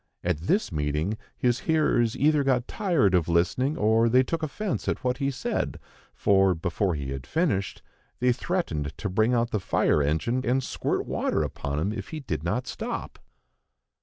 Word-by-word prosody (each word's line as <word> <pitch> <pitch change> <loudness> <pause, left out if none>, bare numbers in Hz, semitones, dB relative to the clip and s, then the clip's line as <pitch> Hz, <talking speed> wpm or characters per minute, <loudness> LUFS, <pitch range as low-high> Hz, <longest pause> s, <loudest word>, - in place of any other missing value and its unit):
At 85 -3 0
this 190 - 0
meeting, 75 +6 -1 0.2
his 125 +1 +1
hearers 150 -8 +2
either 150 0 +3
got 130 -3 +1
tired 170 - +1
of 90 -3 +3
listening 90 - +1
or 110 +2 +3
they 130 +3 +5
took 165 +5 -3
offence 180 +6 -3
at - - -1
what 125 0 0
he 140 -1 0
said, 135 -1 -2 0.4
for, 95 -2 +3
before 90 +2 -1
he 70 -2 -4
had 70 -1 -6
finished, 145 - -1 0.4
they 125 0 +3
threatened 120 - -2
to 100 - -3
bring 110 +6 +2
out 120 0 +1
the 105 - 0
fire 80 -4 +2
engine 80 - 0
and 130 +2 +1
squirt - - -2
water - - 0
upon 70 0 -4
him 95 +8 0
if 100 -3 -6
he 155 - -6
did 80 - -4
not 120 +9 -1
stop. - - -5
115 Hz, 175 wpm, -26 LUFS, 85-135 Hz, 0.4 s, they